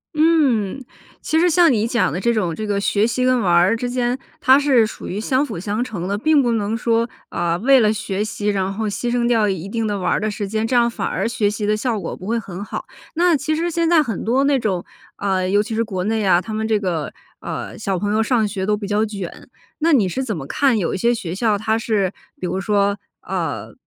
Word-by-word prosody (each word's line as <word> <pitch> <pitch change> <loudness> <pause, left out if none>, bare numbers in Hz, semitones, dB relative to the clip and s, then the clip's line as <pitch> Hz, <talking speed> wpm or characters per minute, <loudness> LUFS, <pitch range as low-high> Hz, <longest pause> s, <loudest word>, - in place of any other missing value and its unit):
嗯， 280 - +2 0.4
其 320 - +1
实 355 +1 +4
像 335 -2 +5
你 220 0 +1
讲 230 - +1
的 180 - -2
这 235 +4 +1
种 180 -7 0
这 215 - -4
个 200 -1 0
学 205 +1 +2
习 250 +2 0
跟 255 -1 +3
玩 190 -6 +1
儿 175 +5 +4
之 245 +2 -3
间， 245 0 0 0.2
它 270 -2 +6
是 265 -6 +4
属 215 - -8
于 195 - -3
相 260 +5 +1
辅 175 - -6
相 210 +5 -2
成 190 -8 -5
的。 200 - -1
并 310 -2 +5
不 240 - +1
能 220 +1 -1
说， 230 0 +1 0.2
啊， 170 0 -1
为 265 +7 +5
了 215 -3 +4
学 205 -2 -2
习， 215 -1 -4
然 195 -1 0
后 220 +2 -3
牺 240 +4 -2
牲 240 -1 +1
掉 220 -4 +3
一 190 -1 -3
定 225 +1 -2
的 205 - -1
玩 185 - 0
儿 - - +1
的 215 - -1
时 205 -1 -4
间， 220 +2 -1
这 250 - 0
样 235 -1 +5
反 235 - -3
而 - - -1
学 215 -3 0
习 210 0 -3
的 210 - +2
效 225 -1 -1
果 - - -5
不 185 - -10
会 230 +1 0
很 195 -3 -7
好。 - - -6 0.3
那 345 0 +4
其 305 +2 -1
实 335 +2 -1
现 335 0 +1
在 335 -2 +5
很 230 -7 -4
多 255 +5 +2
那 280 -1 +3
种， 190 -6 -2 0.3
呃， 190 -2 0
尤 205 +1 +3
其 225 - -6
是 230 - +1
国 190 -5 -3
内 220 +2 0
啊， 180 -3 +4
他 190 +5 -6
们 220 +1 -2
这 220 -1 +2
个， 170 -7 -2 0.3
呃， - - -5
小 195 -1 -1
朋 205 +3 -1
友 220 - +2
上 225 -2 +2
学 190 -2 -3
都 210 0 +2
比 205 - -6
较 210 +1 +1
卷， 200 -5 -6 0.3
那 325 +2 +2
你 215 -8 +4
是 260 +9 -2
怎 215 -9 -3
么 135 - -6
看 260 - +2
有 180 - -1
一 - - -1
些 235 +5 +2
学 180 -7 -4
校 210 +1 +1
它 220 +1 0
是 205 -4 0 0.3
比 - - -4
如 185 +2 -2
说， 200 0 +1 0.2
呃， - - -4
215 Hz, 275 characters per minute, -20 LUFS, 200-245 Hz, 0.4 s, 它